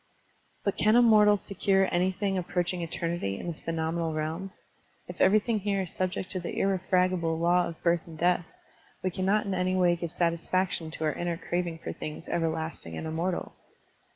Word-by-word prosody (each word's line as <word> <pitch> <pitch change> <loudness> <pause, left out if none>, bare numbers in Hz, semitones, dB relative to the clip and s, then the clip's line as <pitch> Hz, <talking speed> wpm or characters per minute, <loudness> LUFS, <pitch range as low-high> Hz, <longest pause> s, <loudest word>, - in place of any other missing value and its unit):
But 200 - -1
can 215 +2 +4
a 245 - +7
mortal 210 -2 +6
secure 195 0 +1
anything 190 +3 +1
approaching 180 0 -1
eternity 165 - -2
in - - -7
this 170 -3 -4
phenomenal 165 0 -2
realm? 160 +5 -3 0.6
If - - -7
every 205 - +6
thing 220 0 -1
here 200 -1 0
is 180 - -4
subject 185 0 -2
to 185 - -2
the 170 - -5
irrefragable 185 -3 +1
law 175 +1 +3
of 165 - -9
birth 170 -1 +2
and 160 -1 -10
death, 175 +1 +2 0.6
we 185 - 0
cannot 195 +4 +1
in 195 - -2
any 185 0 0
way 175 -2 +4
give 170 -1 -5
satisfaction 170 0 0
to 160 - -6
our 155 -1 +1
inner 175 -1 -2
craving 170 -1 -3
for - - -4
things 155 +1 -7
ever 165 -1 +1
lasting 160 - -4
and - - -5
immortal. 170 +3 -2
175 Hz, 180 wpm, -28 LUFS, 165-190 Hz, 0.6 s, a